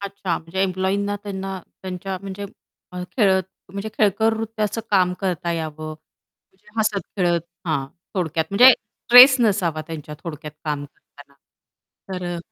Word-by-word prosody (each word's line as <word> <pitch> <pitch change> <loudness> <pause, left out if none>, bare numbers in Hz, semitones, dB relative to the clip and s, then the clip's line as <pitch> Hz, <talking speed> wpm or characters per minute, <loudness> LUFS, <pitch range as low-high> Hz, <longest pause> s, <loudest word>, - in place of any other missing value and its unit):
अच्छा 200 -3 -3
म्हणजे 175 +4 -3
एम्प्लॉयींना 195 +2 0
त्यांना 195 -2 -5 0.2
त्यांच्या 190 +1 -4
म्हणजे 200 +1 -6 0.5
अ, 180 - -5
खेळत 190 -4 +4 0.3
म्हणजे 200 +2 -4
खेळकर 220 +2 +3
रीतीचं 220 0 -2
काम 185 -3 +4
करता 175 -3 -1
यावं. 155 -1 -4 0.6
म्हणजे 190 +2 -27
हसत-खेळत 195 -5 0 0.3
हां, 140 -5 0 0.3
थोडक्यात 160 -4 0
म्हणजे 245 +6 +9
स्ट्रेस 250 +2 +7
नसावा 190 -8 +1
त्यांच्या 155 -2 -7
थोडक्यात 150 -2 -7
काम 145 -2 -2
करताना? 145 0 -18 0.8
तर 180 - -6
अ - - -5
190 Hz, 130 wpm, -22 LUFS, 165-205 Hz, 0.8 s, म्हणजे